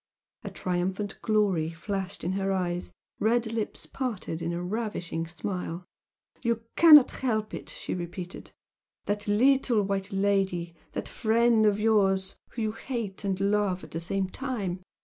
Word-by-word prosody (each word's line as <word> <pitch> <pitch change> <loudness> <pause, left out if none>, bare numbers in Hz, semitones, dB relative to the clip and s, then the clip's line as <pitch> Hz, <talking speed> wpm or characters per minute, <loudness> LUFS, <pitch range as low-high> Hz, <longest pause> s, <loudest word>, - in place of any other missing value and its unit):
A - - -4
triumphant 185 +3 -2
glory 200 -8 +2
flashed 190 +3 -4
in 175 - 0
her 195 0 0
eyes 180 -2 -1 0.3
her - - -2
red 230 -1 +1
lips 220 -2 -3
parted 215 -10 -4
in 170 0 -1
a 170 - -2
ravishing 180 -5 -3
smile. 175 +1 -4 0.6
"You 230 -1 0
cannot 305 -5 +9
help 215 -5 -1
it!" - - -6
she - - -5
repeated 175 +1 -6 0.5
"That 205 0 -2
little 240 +1 +4
white 195 +1 -2
lady 195 -3 +1 0.2
that - - -3
friend 225 -1 +3
of 205 0 +2
yours 195 -3 +2 0.2
whom 230 - -4
you 215 - 0
hate 225 -4 -5
and 190 -2 -1
love 200 -2 +1
at - - -11
the 165 - -3
same 190 +3 -1
time! 200 -6 -3
200 Hz, 150 wpm, -28 LUFS, 180-220 Hz, 0.6 s, cannot